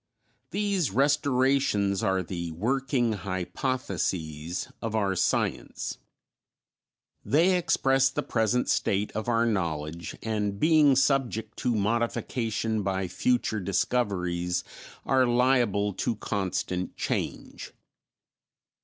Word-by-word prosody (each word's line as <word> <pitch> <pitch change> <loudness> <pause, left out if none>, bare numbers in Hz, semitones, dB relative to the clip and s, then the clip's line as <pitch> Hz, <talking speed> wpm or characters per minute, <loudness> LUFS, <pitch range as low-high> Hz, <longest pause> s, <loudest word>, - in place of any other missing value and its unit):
These 200 -6 0
restorations 130 -6 +2
are 95 -1 +1
the 85 -1 -5
"working 125 - 0
hypotheses" 90 - -3
of 115 -1 -3
our 100 -3 +1
science; - - -1 1.2
they 170 +6 +3
express 135 -6 +3
the 130 - -3
present 115 +2 +1
state 100 +2 +1
of 110 +3 -3
our 115 0 +3
knowledge, 85 -6 -2
and, 105 -3 -2
being 155 -2 +5
subject 125 -5 +1
to 125 -3 0
modification 115 0 -1
by 95 -1 -1
future 115 +3 0
discoveries, 90 -3 0 0.4
are 130 -1 +3
liable 120 -5 +2
to 115 +4 -1
constant 95 -3 -3
change. - - -4
110 Hz, 95 wpm, -27 LUFS, 95-130 Hz, 1.2 s, being